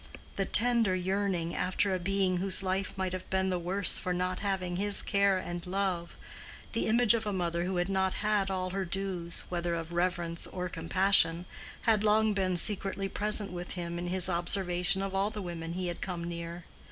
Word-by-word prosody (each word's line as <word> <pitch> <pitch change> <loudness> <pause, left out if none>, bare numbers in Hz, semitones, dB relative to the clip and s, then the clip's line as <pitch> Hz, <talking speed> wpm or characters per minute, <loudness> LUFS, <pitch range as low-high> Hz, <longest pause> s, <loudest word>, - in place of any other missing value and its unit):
The 195 - -1
tender 230 -4 +6
yearning 185 -2 -2
after 190 +2 0
a 185 - -1
being 190 0 0
whose 190 +1 +5
life 190 +1 -1
might 190 -1 -2
have 185 0 -6
been 190 0 0
the 180 - -1
worse 185 +3 +2
for 180 -1 -2
not 180 0 -2
having 185 -3 -2
his 205 +1 +3
care 200 -1 +2
and 175 -1 -5
love, 185 -2 -2 0.6
the 230 - 0
image 235 +1 +4
of 225 -2 -2
a - - -1
mother 175 -2 -2
who 185 +1 -3
had 175 0 0
not 190 -1 0
had 210 -2 0
all 185 -1 -3
her 195 +1 -2
dues, 180 -2 -1
whether 175 -1 -2
of 165 0 -6
reverence 175 -1 -1
or 180 -1 -5
compassion, 170 0 +2 0.4
had 220 -2 +2
long 215 0 +3
been 190 -2 0
secretly 195 +1 -1
present 210 -1 +3
with 175 0 -6
him 170 -1 -5
in 175 - -4
his 185 0 +4
observation 180 +1 0
of 195 -1 -4
all 195 +2 +1
the 215 -1 -7
women 170 -3 -6
he 185 +1 -4
had 175 -1 -5
come 175 -3 -4
near. 170 0 -6
185 Hz, 195 wpm, -30 LUFS, 175-195 Hz, 0.6 s, tender